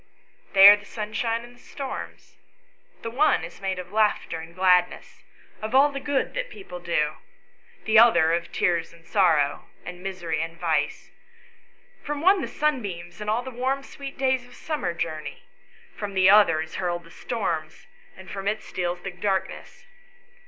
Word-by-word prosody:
" - - -33
They 195 0 +10
are 205 - +11
the 205 - -14
sunshine 225 +2 -3
and 240 0 -13
the - - -22
storms. 270 -2 -8 0.6
The 230 - -4
one 295 +6 +3
is - - -10
made 190 -1 -2
of 180 0 -8
laughter 210 -6 +1
and 165 0 -9
of 170 - -20
gladness, 180 -1 +2 0.4
of 215 +3 -3
all 285 +2 +6
the 275 - -4
good 285 -1 -1
that - - -3
people 385 - -9
do; 155 -3 -1 0.7
the 220 0 +6
other 175 -9 +6
of 170 0 -2
tears 170 -3 0
and 165 -1 -19
sorrow 160 -9 +2 0.2
and 180 +1 -8
misery 175 -5 -3
and 165 0 -6
vice; 165 -2 -1 0.9
from 295 0 -4
the - - -7
one 380 0 +5
the - - -3
sunbeams 205 - -3
and 210 - -3 0.2
the 260 - -6
warm 260 +3 -1
sweet 275 0 -9
days 260 -1 +1
of 245 - -16
summer 295 - -3
journey; 155 -2 -5 0.5
from 205 -2 -6
the 190 0 +6
other 205 -7 +5
is 160 - -7
hurled 175 -2 -2
the 165 - -17
storms, 170 -11 -4 0.3
and 190 0 -11
from 195 0 -5
it 215 +1 -1
steals 175 -1 -3
the 195 - -4
darkness. 190 - -3
195 Hz, 175 wpm, -25 LUFS, 175-245 Hz, 0.9 s, are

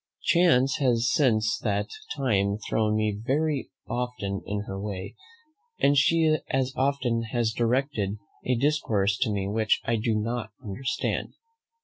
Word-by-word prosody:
Chance 135 -7 +4
has 120 -4 +2
since 115 -7 +2
that 105 -2 0 0.3
time 100 -8 +1
thrown 110 -1 +1
me 110 -1 +1
very 145 +2 0 0.2
often 120 -5 -3
in 100 +1 -2
her 95 -1 -6
way, 100 -1 -5 0.7
and 140 - +4
she 155 +2 +4
as 135 0 0
often 130 -4 +1
has 115 -2 +1
directed 120 -4 0 0.3
a 125 - +1
discourse 115 -8 +1
to 130 - +1
me 100 -1 -1
which 110 +1 +1
I 115 0 +1
do 110 0 0
not 110 +1 -2
understand. 115 +6 -3
115 Hz, 135 wpm, -26 LUFS, 105-135 Hz, 0.7 s, Chance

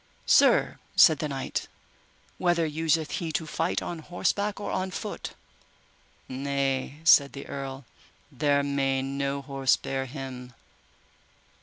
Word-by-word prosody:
Sir, - - +4 0.2
said 155 -4 +7
the 155 - -1
knight, 135 -1 -3 0.7
whether 175 -2 +2
useth 160 0 0
he 165 -2 -3
to 160 - -1
fight 155 - -1
on 170 - -5
horseback 200 +5 -1
or 205 - -4
on 185 0 -1
foot? 185 - -6 0.9
Nay, 135 +1 -2
said 140 -3 +6
the 140 - -7
earl, 135 -1 -6 0.5
there 145 -1 +2
may 135 -1 0
no 140 +1 -2
horse 135 -1 +2
bear 135 0 -3
him. 130 -2 -8
140 Hz, 125 wpm, -27 LUFS, 135-160 Hz, 0.9 s, said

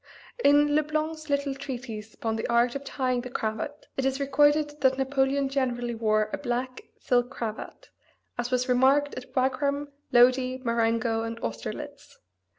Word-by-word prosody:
In 290 +1 +5
Le 305 - +4
Blanc's 310 +1 -3
little 280 -1 0
treatise 245 -6 -7
upon 225 -1 -2
the 220 - -3
art 235 0 +3
of 275 - -5
tying 255 -3 -1
the 250 - -7
cravat 220 +5 -4
it 270 - 0
is 270 +1 0
recorded 295 +2 +2
that 265 -1 +3
Napoleon 270 +1 +1
generally 245 -3 -1
wore 215 -1 +1
a - - -2
black 255 -1 -3 0.2
silk 245 -1 +1
cravat, 220 -3 -6 0.4
as 240 0 -3
was 250 0 0
remarked 270 +3 +3
at 255 0 -9
Wagram, 280 +2 0 0.2
Lodi, 255 +1 +4
Marengo 230 -1 +1
and 230 0 -5
Austerlitz. 115 -1 -6
255 Hz, 155 wpm, -27 LUFS, 235-280 Hz, 0.4 s, In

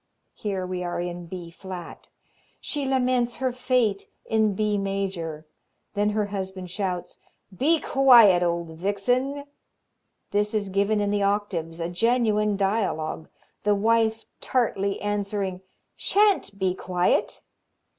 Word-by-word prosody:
Here 195 -4 -3
we 180 0 -3
are 175 -1 -3
in 175 0 -5
B 175 -1 -7
flat. 180 -1 -9 0.5
She 285 -3 -2
laments 250 -2 +1
her 260 -1 -1
fate 250 -5 0 0.2
in 220 -2 +2
B 210 0 +1
major. 195 -6 -3 0.5
Then 205 0 +1
her 210 0 0
husband 190 -2 -5
shouts: 185 -2 -3 0.4
"Be 310 - +3
quiet, 240 -11 +6
old 170 -1 0
vixen." 245 - -1 0.9
This 210 +1 0
is 205 -2 -1
given 200 +2 +1
in 205 0 0
the 205 0 +1
octaves, 200 -5 -1
a 165 - -1
genuine 210 +1 +1
dialogue, 195 -6 -1 0.3
the 210 0 +2
wife 225 +1 +2
tartly 200 -6 0
answering: 200 -2 -2 0.3
"Shan't 400 - +2
be 190 -2 +1
quiet." 180 -1 0
200 Hz, 125 wpm, -25 LUFS, 185-225 Hz, 0.9 s, quiet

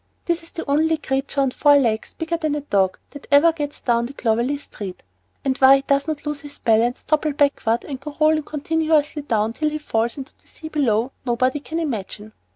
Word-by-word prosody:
This 340 -1 0
is 330 - -15
the 330 - -6
only 315 +3 +2
creature 275 -1 -1
with 255 - -2
four 290 -1 +5
legs, 225 -5 0
bigger 325 +1 -2
than 310 -3 -1
a 295 - -3
dog, 195 -9 +1
that 285 - -11
ever 295 +4 +6
gets 295 -2 -5
down 235 -1 +1
the 270 - -10
Clovelly 240 +4 0
street; 200 -9 -9 0.4
and 265 -1 +1
why 270 0 +8
he 275 - 0
does 280 +1 +1
not 310 -2 -4
lose 295 -1 -3
his 290 -1 -10
balance, 230 +2 +1
topple 305 -1 +1
backward, 275 -5 +1
and 270 -3 -6
go 290 +1 -9
rolling 310 0 +4
continuously 310 0 0
down 225 -5 0
till 305 +4 0
he 305 - -3
falls 235 -5 -1
into 275 +1 -8
the - - -27
sea 315 - -10
below, 250 -5 +1
nobody 255 +3 0
can 315 +3 -6
imagine. 215 - -4
285 Hz, 210 wpm, -22 LUFS, 240-305 Hz, 0.4 s, why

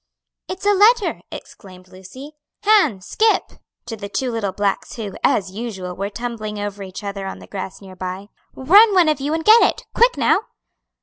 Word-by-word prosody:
"It's 375 +1 -7
a 410 - +4
letter!" 425 +2 +3
exclaimed 185 -2 -12
Lucy. 190 +11 -12 0.3
"Han, 395 - +3
Scip," 435 - +1 0.3
to 235 -1 -6
the 200 -2 -8
two 255 +4 -2
little 220 -4 -2
blacks 200 +1 -2
who, 210 -5 -6
as 190 -2 +1
usual, 190 -4 -6
were 195 +2 -4
tumbling 215 -1 -6
over 205 -1 -5
each 190 +1 -8
other 200 -1 -5
on - - -6
the - - -13
grass 195 -1 -7
near 190 -1 -12
by, 185 +2 -6 0.3
"run, 400 +10 +5
one 350 -4 +5
of 305 -3 -1
you 285 +2 -2
and 320 - -4
get 445 +2 +7
it, - - +1
quick 485 +1 +3
now!" 405 - +2
215 Hz, 185 wpm, -20 LUFS, -, 0.3 s, get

